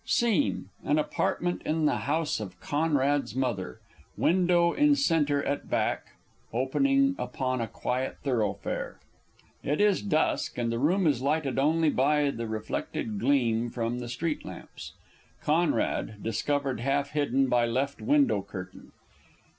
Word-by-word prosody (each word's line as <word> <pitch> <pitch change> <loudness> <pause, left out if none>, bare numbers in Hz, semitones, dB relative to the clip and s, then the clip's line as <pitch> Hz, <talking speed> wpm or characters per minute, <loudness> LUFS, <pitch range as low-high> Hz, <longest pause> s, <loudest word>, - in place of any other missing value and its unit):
_ - - -11
SCENE 185 - +2 0.2
An 150 - +2
Apartment 175 +3 -1
in 155 0 0
the 150 - 0
house 155 -2 0
of 90 -4 -7
CONRAD'S 145 -4 0
_Mother, 110 - -2 0.4
window 175 -1 +3
in 295 0 +4
centre 150 - +2
at 140 - -3
back, - - -1 0.4
opening 275 - +2
upon 130 -2 -2
a 115 - -2
quiet 130 +3 -3
thoroughfare. 115 -7 -2 0.7
It 145 - -1
is 205 -2 +3
dusk, 160 -6 0
and 120 -1 0
the 115 - -1
room 180 +8 +2
is 140 -6 +2
lighted 140 -1 0
only 155 +2 +3
by 145 +2 +2
the 115 -3 -5
reflected 110 -1 -3
gleam 120 -2 +2
from 115 +1 -2
the 120 -1 -6
street 150 +6 -2
lamps._ - - -9 0.5
CONRAD 150 -9 0
_discovered 140 +3 -1
half 140 +3 0
hidden 135 -3 +1
by 120 -1 +2
left 135 +4 -1
window 285 - +3
curtain. 95 -2 -10
140 Hz, 140 wpm, -28 LUFS, 120-160 Hz, 0.7 s, in